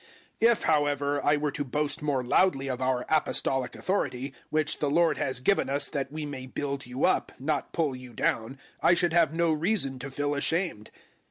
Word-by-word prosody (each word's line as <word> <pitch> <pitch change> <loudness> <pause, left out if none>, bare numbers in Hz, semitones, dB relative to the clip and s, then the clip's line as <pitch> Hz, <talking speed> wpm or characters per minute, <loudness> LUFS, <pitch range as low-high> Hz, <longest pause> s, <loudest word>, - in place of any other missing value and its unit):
010:008 230 +1 +7
If, 235 - 0
however, 145 -2 +1
I 145 0 +3
were 145 0 -1
to 145 - -3
boast 145 +3 -2
more 140 -4 0
loudly 135 +1 +2
of 130 -1 -3
our 130 -1 0
Apostolic 135 -4 +1
authority, 135 -8 -2 0.2
which 155 -1 +1
the 145 - 0
Lord 165 +3 +2
has 130 -1 -2
given 195 +5 +2
us 140 +1 +1
that 140 -3 -3
we 155 0 -4
may 135 -3 -7
build 140 0 -4
you 125 +3 -1
up, - - +1
not 145 +1 -2
pull 155 -6 0
you 125 -1 -10
down, 115 +3 -1 0.2
I 175 - +5
should 175 -1 +1
have 170 -4 +4
no 165 0 +1
reason 155 -4 0
to 135 +2 -6
feel 145 +2 -1
ashamed. 145 - 0
145 Hz, 195 wpm, -28 LUFS, 135-155 Hz, 0.2 s, 010:008